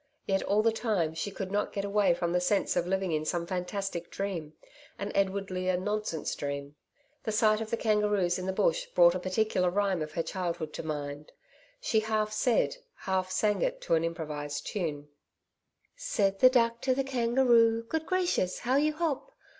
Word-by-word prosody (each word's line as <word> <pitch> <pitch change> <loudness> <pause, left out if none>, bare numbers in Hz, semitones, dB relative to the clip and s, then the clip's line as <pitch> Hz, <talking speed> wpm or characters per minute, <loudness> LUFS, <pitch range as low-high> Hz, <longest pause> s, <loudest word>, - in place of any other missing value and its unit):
Yet 195 -1 +1
all 210 +2 +2
the 230 - +4
time, 210 -8 0
she 165 +5 -3
could 195 -1 -6
not 205 +1 0
get 200 -1 -2
away 200 -3 +3
from 170 0 -1
the 180 - +2
sense 195 +3 +1
of 175 - 0
living 190 -1 0
in 155 -1 0
some 170 +2 -1
fantastic 180 -1 -3
dream 175 -6 -4 0.4
an 200 +1 -4
Edward 195 0 0
Lear 185 0 0
nonsense 205 -3 -2
dream. 140 0 -5 0.5
The 220 - -2
sight 215 0 +3
of 220 - -4
the 230 - -1
kangaroos 210 -5 +1
in 185 - -4
the - - +1
Bush - - +1
brought - - +5
a - - -2
particular 185 -1 +1
rhyme 195 -2 0
of 155 0 -5
her 165 - -1
childhood 170 -5 -3
to - - -4
her 160 - -9
mind. 145 -1 -5 0.5
She 225 - +1
half 215 -1 -1
said, 245 - +1 0.2
half 185 -1 -1
sang 210 +2 +1
it - - 0
to - - -1
an 165 0 +3
improvised 150 -3 -4
tune: 150 -7 -3 0.9
'Said 210 - 0
the 255 - +8
Duck 230 -2 +2
to 260 -1 +1
the 270 - +1
Kangaroo, 235 -3 +3
"Good 320 +7 -3
gracious! 355 - +1
how 255 +3 +2
you 305 +2 +2
hop! 315 - -2
200 Hz, 190 wpm, -29 LUFS, 175-230 Hz, 0.9 s, the